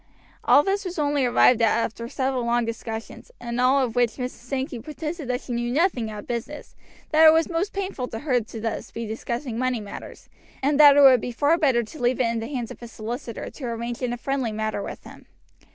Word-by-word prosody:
All 290 - +6
this 395 +3 0
was 365 -2 -6
only 290 -3 +1
arrived 240 0 +4
at 225 0 +3
after 230 0 -3
several 260 -1 -1
long 235 0 +1
discussions, 225 - -6
in 235 0 -4
all 255 +2 +4
of 245 -2 -3
which 240 -2 +2
Mrs. 250 -1 -3
Sankey 260 +1 -5
protested 305 +3 -6
that 250 0 -1
she 245 - -6
knew 240 0 -1
nothing 270 - +1
of 210 -1 -8
business, 240 +5 -6 0.4
that 315 +1 +7
it - - +10
was 325 0 +3
most 345 +5 -1
painful 380 -10 -4
to 225 - -6
her 250 -1 +1
to 220 - -14
be - - -5
thus 225 -1 -4
discussing 230 +2 -4
money 255 -2 0
matters, 205 -1 -10 0.4
and 285 +1 +2
that 290 -1 +9
it - - +7
would 260 -4 +7
be 245 - -4
far 290 +7 +2
better 270 -8 +2
to 245 +6 -11
leave 245 +1 +1
it - - +3
in 230 0 -1
the 225 - -5
hands 250 -5 -4
of - - -11
a 235 - -7
solicitor 230 +1 -6
to 275 - -8
arrange 235 +1 -4
in 250 -1 -1
a 245 - -3
friendly 265 -2 -2
manner 215 -1 -2
with - - -7
him. - - -14
245 Hz, 230 wpm, -24 LUFS, 230-285 Hz, 0.4 s, it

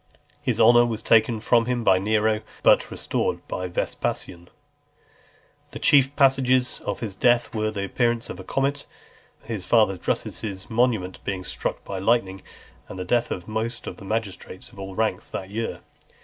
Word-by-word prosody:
This - - 0
honour 120 0 +6
was 115 -2 -4
taken 115 0 +4
from 115 +1 +2
him 125 -1 -1
by 95 -4 +4
Nero, 110 +2 +1 0.2
but - - +5
restored - - -2
by 90 0 -3
Vespasian. 85 0 -3
XLVI. - - -34
The - - -5
chief 140 0 +4
presages 130 -2 +3
of - - -4
his 105 -5 -4
death 120 +1 +2
were, 110 -1 0
the 100 -2 -3
appearance 120 +2 0
of 90 - -7
a - - -7
comet, 140 +7 -1 0.6
his 110 -4 -5
father 95 -2 +3
Drusus's 95 +2 -3
monument 110 -6 0
being 95 -2 -3
struck - - -4
by 95 - -4
lightning, 95 -2 +1 0.5
and - - -9
the 90 - -4
death 120 +5 +1
of 90 - -5
most 115 +2 -3
of - - -7
the 100 - -11
magistrates 100 -3 -4
of 100 - -15
all 95 -1 -7
ranks 110 -4 -1
that 95 +1 -6
year. 115 +2 -4
110 Hz, 170 wpm, -24 LUFS, 95-120 Hz, 0.6 s, honour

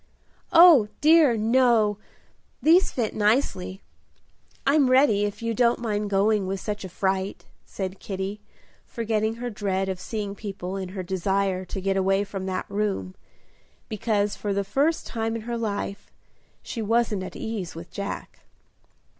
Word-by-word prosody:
"Oh, 330 - +8
dear, 305 -6 +5
no! 225 -2 +3 0.6
these 340 +5 +4
fit 230 -4 -2
nicely. 210 -4 0 0.8
I'm 280 -1 +4
ready, 255 -6 +4
if 205 +3 -5
you 230 0 -1
don't 240 +1 +3
mind 210 -3 -2
going 200 0 +2
with 195 0 -2
such 205 0 -4
a 190 - -6
fright," 190 +1 -2 0.2
said 190 -1 -5
Kitty, 195 +1 -5 0.5
forgetting 220 -1 -1
her 245 +1 -5
dread 195 -2 -1
of 190 -1 -3
seeing 210 -2 -4
people 195 -2 -6
in 190 -2 -4
her 185 - -2
desire 190 +1 -1
to 195 - -5
get 195 +1 0
away 195 +1 +2
from 195 -2 -6
that 185 -1 -2
room, 200 -2 -2 0.8
because 210 -2 0
for 205 -1 -3
the 200 - 0
first 285 +11 0
time 225 -1 -2
in 225 - -5
her 235 +1 -3
life 205 -3 -4 0.5
she 230 - -5
wasn't 220 -2 +1
at 185 - -7
ease 210 -7 -5
with 165 +1 -9
Jack. 200 0 -6
205 Hz, 150 wpm, -25 LUFS, 195-230 Hz, 0.8 s, Oh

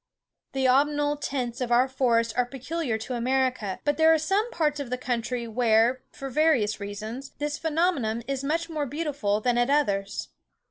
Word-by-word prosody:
The 265 -1 +1
autumnal 290 +3 +3
tints 260 -4 -3
of 245 -1 -2
our 245 +2 +5
forests 235 -4 +1
are 250 0 +1
peculiar 270 -1 -3
to 220 +4 -6
America, 250 -4 0
but 290 0 +1
there 320 0 +6
are 320 - +5
some 390 +9 0
parts 300 -7 0
of 280 -4 -5
the 250 - -1
country 245 -1 -2
where, 230 +2 +3
for 270 -1 -7
various 255 -9 +2
reasons, 215 +6 -6
this 295 0 -3
phenomenon 310 -9 0
is 275 -1 -2
much 330 +4 -1
more 305 -3 -3
beautiful 275 -8 -1
than 240 +1 +2
at 240 +2 +2
others. 205 -9 0
260 Hz, 175 wpm, -26 LUFS, 235-295 Hz, -, there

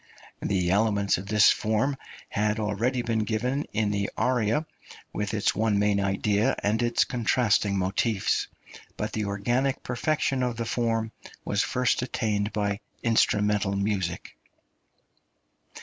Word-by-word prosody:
The 90 -3 0
elements 100 -2 +2
of 95 - -9
this 105 0 +6
form 110 +6 0 0.3
had 105 +1 0
already 115 +4 0
been 115 -2 0
given 120 +6 -1
in 105 -1 0
the 100 -1 -1
aria, 125 +3 +1 0.5
with 105 -1 -2
its 105 - +1
one 110 0 +1
main 105 0 +2
idea 100 +2 +1
and 105 +3 +1
its 120 0 +2
contrasting 110 -4 +1
motifs; 95 +3 0 0.5
but 105 0 -3
the 110 -1 -1
organic 120 +7 -1
perfection 135 +1 0
of 125 -2 -1
the 115 - -2
form 115 -1 -1 0.3
was 100 - +1
first 125 -1 +1
attained 110 -4 -1
by 100 -1 -1 0.2
instrumental 105 -3 +2
music. 100 -4 -2
105 Hz, 130 wpm, -26 LUFS, 100-120 Hz, 0.5 s, this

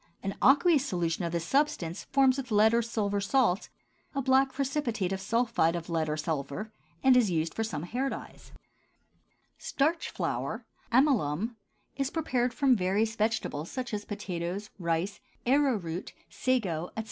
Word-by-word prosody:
An 195 0 -2
aqueous 290 +1 +5
solution 175 - -1
of 170 - -2
this 170 -1 -2
substance 190 - 0
forms 270 -1 +3
with 265 -2 -5
lead 215 +1 +5
or 235 - +4
silver 205 -3 -1
salts 200 -3 +2 0.5
a 275 - +1
black 265 +1 +4
precipitate 260 -8 -1
of 190 0 -2
sulphide 230 -5 +1
of 170 0 -5
lead 160 -2 0
or 150 - -1
silver, 155 +7 -3 0.3
and 265 -1 +6
is 240 -5 +4
used 165 -2 -1
for 225 - -1
some 165 -9 -4
hair 250 +9 -1
dyes. - - -9 1.1
STARCH 320 +4 0
FLOUR - - -3 0.3
(amylum) 230 - +2 0.4
is 275 -1 0
prepared 255 -7 0
from 270 -1 +3
various 205 +3 +1
vegetables 215 -8 -1
such 250 -3 -5
as 205 -1 -2
potatoes, 200 -1 -4
rice, 170 +3 -1 0.3
arrowroot, 235 - +1 0.2
sago, 190 -11 0
etc. - - 0
220 Hz, 150 wpm, -29 LUFS, 175-260 Hz, 1.1 s, and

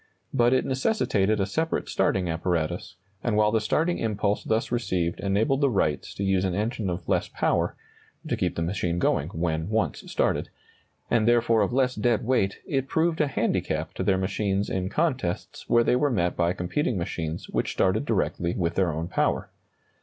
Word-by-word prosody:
But 120 0 +4
it 130 - +2
necessitated 110 - +1
a 95 - +2
separate 160 +11 -1
starting 95 -2 +1
apparatus, 85 -1 -2 0.3
and 115 -3 +1
while 105 0 +4
the 110 0 +2
starting 165 +11 +1
impulse 105 -2 0
thus 110 +1 0
received 95 -8 -1
enabled 110 +8 +1
the 140 - +4
Wrights 85 -10 -1
to 100 - -3
use 95 -1 +2
an 95 -2 0
engine 105 0 -1
of 85 -1 -4
less - - +1
power - - 0 0.5
(to - - 0
keep - - -1
the 85 - -1
machine 85 -1 -1
going - - +1
when 80 0 -2
once 110 0 0
started), - - 0 0.6
and 115 -2 +3
therefore 115 -2 +4
of 100 - +1
less 130 0 +2
dead 115 0 +1
weight, 105 -6 +1
it 135 -2 -1
proved 160 +2 +1
a 150 - +2
handicap 135 - -1
to - - -5
their 95 - +2
machines 95 +1 -1
in 95 0 -1
contests 135 - -2
where 120 0 +5
they 125 - +3
were 145 +3 +2
met 90 -8 0
by 85 0 +2
competing 105 +7 -1
machines 85 -2 -4
which - - -1
started 95 +7 +2
directly 95 -7 -1
with 85 -2 0
their 95 -2 +1
own 80 +2 -3
power. 90 - 0
105 Hz, 185 wpm, -26 LUFS, 90-120 Hz, 0.6 s, where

